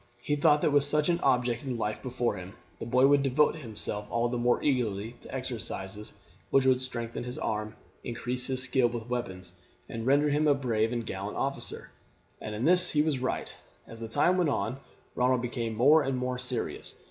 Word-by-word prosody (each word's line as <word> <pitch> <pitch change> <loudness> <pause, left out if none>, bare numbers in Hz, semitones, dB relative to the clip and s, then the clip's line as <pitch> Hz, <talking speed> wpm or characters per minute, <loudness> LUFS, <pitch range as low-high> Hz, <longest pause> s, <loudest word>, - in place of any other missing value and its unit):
He 145 +5 -1
thought 150 0 +4
that - - +2
with 145 -1 +4
such 150 +2 +2
an 170 0 +2
object 125 -3 +1
in 130 -3 -3
life 105 -1 -3
before 125 -3 -2
him 95 0 -9 0.3
the - - -6
boy 125 +2 +4
would 140 0 +5
devote 140 +4 +2
himself 105 -5 -5
all 120 +1 0
the 125 - -2
more 120 0 +1
eagerly 115 -6 -1
to - - -11
exercises 110 -5 -5 0.4
which 135 -1 +3
would 130 -1 +3
strengthen 120 -3 -2
his 125 +1 -5
arm, 110 0 -3 0.3
increase 125 +1 0
his 130 -1 +3
skill 130 -1 +2
with 120 0 -6
weapons, 95 -7 -4 0.4
and 115 +1 -5
render 145 +2 +4
him 150 +1 +2
a 145 - +5
brave 115 -4 0
and 120 -2 -3
gallant - - -5
officer, - - -3 0.5
and 105 - -5
in 115 +5 -2
this 180 +2 +7
he 150 -1 +2
was 150 -4 0
right. 130 - -3 0.3
As 115 - -12
the 115 - -5
time 180 +11 +2
went 170 -4 +2
on 110 +2 -2 0.3
Ronald 125 0 +1
became 120 -2 -3
more 145 +8 +5
and 135 -2 -1
more 125 0 -2
serious. 125 -1 -4
125 Hz, 200 wpm, -28 LUFS, 115-140 Hz, 0.5 s, this